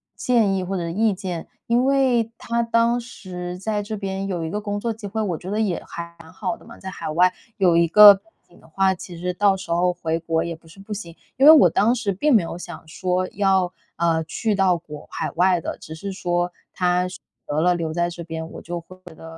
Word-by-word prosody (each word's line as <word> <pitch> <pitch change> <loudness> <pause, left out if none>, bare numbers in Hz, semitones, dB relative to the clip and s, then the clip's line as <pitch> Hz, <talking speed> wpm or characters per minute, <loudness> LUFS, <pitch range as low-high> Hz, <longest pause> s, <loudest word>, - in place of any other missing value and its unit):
建 225 -6 +2
议 185 - -1
或 190 +1 -3
者 170 -1 -3
意 210 +4 +2
见。 180 -4 -5 0.2
因 240 +2 +3
为 255 -5 +2
他 235 0 -1
当 230 +1 +2
时 180 -6 -7
在 210 +2 -2
这 215 +1 -5
边 195 0 -3
有 175 -4 -3
一 - - -3
个 210 +4 -3
工 205 0 -3
作 230 +1 -2
机 215 -2 -8
会， 220 +2 -3
我 180 -6 -1
觉 185 - -8
得 215 - -1
也 195 -6 -1
还 170 0 -8
蛮 160 - -14
好 225 +5 -3
的 - - -19
嘛， 230 - -13
在 190 - -7
海 185 - -6
外 180 +4 +3 0.2
有 180 -4 +4
一 170 0 +4
个 210 +3 +10
背 195 - -16 0.3
景 175 - -20
的 - - -19
话， 190 +3 +2
其 175 -1 -9
实 180 +1 -2
到 195 0 +3
时 170 -3 -8
候 180 +1 +2
回 165 -2 -2
国 165 0 0
也 170 -1 -4
不 160 0 -21
是 180 +5 -16
不 210 +2 -7
行。 170 -5 -7 0.2
因 270 - +4
为 310 - +12
我 315 - +7
当 220 +5 +3
时 220 -4 -1
并 285 +7 +2
没 195 - +4
有 165 - -6
想 175 -2 -9
说 185 +2 -1
要， 190 -3 +1 0.2
呃， 165 -1 +1
去 215 +6 -1
到 185 -3 +3
国 150 -3 -11
海 - - -3
外 180 0 +3
的， - - -5
只 160 - -9
是 200 +4 -6
说 175 -1 -1 0.2
他 180 0 +1 0.4
得 150 +1 -1
了 180 +1 +4
留 165 -2 -2
在 175 0 0
这 170 0 -8
边， 160 0 -6
我 - - -9
就 175 0 -5
会 185 +2 -15
觉 165 -3 -12
得 - - -14
185 Hz, 265 characters per minute, -22 LUFS, 170-210 Hz, 0.4 s, 为